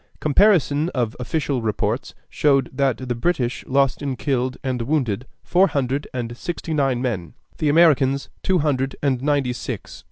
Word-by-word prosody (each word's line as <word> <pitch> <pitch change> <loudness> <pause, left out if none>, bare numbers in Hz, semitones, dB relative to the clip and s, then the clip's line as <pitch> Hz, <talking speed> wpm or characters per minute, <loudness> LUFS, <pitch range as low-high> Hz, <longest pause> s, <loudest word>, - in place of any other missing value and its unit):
Comparison 155 -2 +3
of 120 -3 -1
official 140 0 -1
reports 110 -2 -2
showed 140 -2 +2
that 135 -2 +1
the 125 - 0
British 125 -1 -1
lost 135 +1 +2
in 140 -2 -2
killed 130 -1 -1
and 130 -2 -2
wounded 125 -3 -1 0.2
four 185 +2 +4
hundred 140 -2 -1
and 120 -2 -4
sixty 170 +2 -4
nine 135 -4 +1
men; 95 - -3 0.2
the 155 - +2
Americans, 145 -4 +4
two 190 -1 +2
hundred 135 -4 0
and 130 -3 +1
ninety 140 -3 +1
six. - - -6
135 Hz, 155 wpm, -22 LUFS, 125-150 Hz, 0.2 s, four